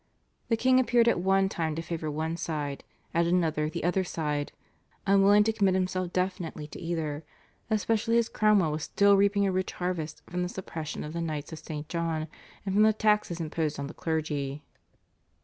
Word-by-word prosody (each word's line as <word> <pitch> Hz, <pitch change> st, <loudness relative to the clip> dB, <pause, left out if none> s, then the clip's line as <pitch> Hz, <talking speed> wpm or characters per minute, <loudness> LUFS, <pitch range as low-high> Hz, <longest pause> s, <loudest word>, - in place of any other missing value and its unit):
The 230 Hz, -, +3 dB
king 255 Hz, +2 st, +4 dB
appeared 240 Hz, -2 st, +3 dB
at 235 Hz, -, +3 dB
one 195 Hz, +1 st, +3 dB
time 160 Hz, -5 st, -2 dB
to 165 Hz, -, -3 dB
favour 160 Hz, -2 st, -4 dB
one 160 Hz, +2 st, -2 dB
side, 150 Hz, -4 st, -3 dB, 0.3 s
at 170 Hz, 0 st, +2 dB
another 160 Hz, -3 st, +1 dB
the 170 Hz, +1 st, -5 dB
other 180 Hz, +2 st, +2 dB
side, 150 Hz, -5 st, -2 dB, 0.5 s
unwilling 200 Hz, +1 st, +6 dB
to 220 Hz, +1 st, +1 dB
commit 195 Hz, -4 st, +2 dB
himself 185 Hz, -1 st, -1 dB
definitely 180 Hz, -4 st, -2 dB
to -, -, -9 dB
either, 160 Hz, -3 st, -3 dB, 0.5 s
especially 225 Hz, +1 st, +1 dB
as 235 Hz, -1 st, +3 dB
Cromwell 210 Hz, -8 st, +3 dB
was 155 Hz, +1 st, -3 dB
still 200 Hz, +3 st, +4 dB
reaping 200 Hz, 0 st, +3 dB
a 195 Hz, -, +1 dB
rich 185 Hz, 0 st, -1 dB
harvest 170 Hz, -4 st, -3 dB
from 180 Hz, +1 st, -3 dB
the 180 Hz, -, -1 dB
suppression 160 Hz, -5 st, -5 dB
of 150 Hz, -, -6 dB
the 170 Hz, -, -2 dB
Knights 155 Hz, -2 st, -4 dB
of 160 Hz, -, -7 dB
St. 150 Hz, -1 st, -6 dB
John 165 Hz, -2 st, -2 dB, 0.4 s
and 190 Hz, -, -1 dB
from 205 Hz, -, +4 dB
the 215 Hz, 0 st, +6 dB
taxes 210 Hz, -5 st, +1 dB
imposed 155 Hz, -1 st, -2 dB
on 140 Hz, -, -3 dB
the 145 Hz, -, -7 dB
clergy. 150 Hz, -3 st, -2 dB
175 Hz, 185 wpm, -28 LUFS, 155-200 Hz, 0.5 s, unwilling